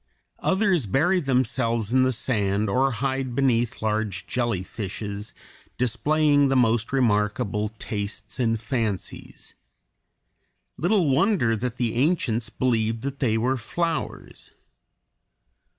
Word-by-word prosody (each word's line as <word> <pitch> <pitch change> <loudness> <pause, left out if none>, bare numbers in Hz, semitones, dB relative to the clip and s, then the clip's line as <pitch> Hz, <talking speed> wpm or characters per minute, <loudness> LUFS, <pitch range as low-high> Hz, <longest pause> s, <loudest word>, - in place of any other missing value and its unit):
Others 190 - +1
bury 175 - +2
themselves 125 - 0
in 130 - +5
the 130 0 +3
sand 105 -4 0
or 135 +5 +3
hide 130 +1 -2
beneath 120 -4 +1
large 105 -3 -1
jellyfishes, 105 -2 -3 0.5
displaying 145 +4 +2
the 135 - +2
most 115 -3 +2
remarkable 105 -3 +1
tastes 100 0 -5
and 115 -2 +1
fancies. 115 -5 -4 1.2
Little 180 0 +2
wonder 140 - +2
that 120 +2 -3
the 115 -2 0
ancients 120 -5 +1
believed 115 -2 0
that 140 0 -4
they 115 -4 +1
were 130 +4 +1
flowers. 165 +7 -4
120 Hz, 105 wpm, -25 LUFS, 110-135 Hz, 1.2 s, in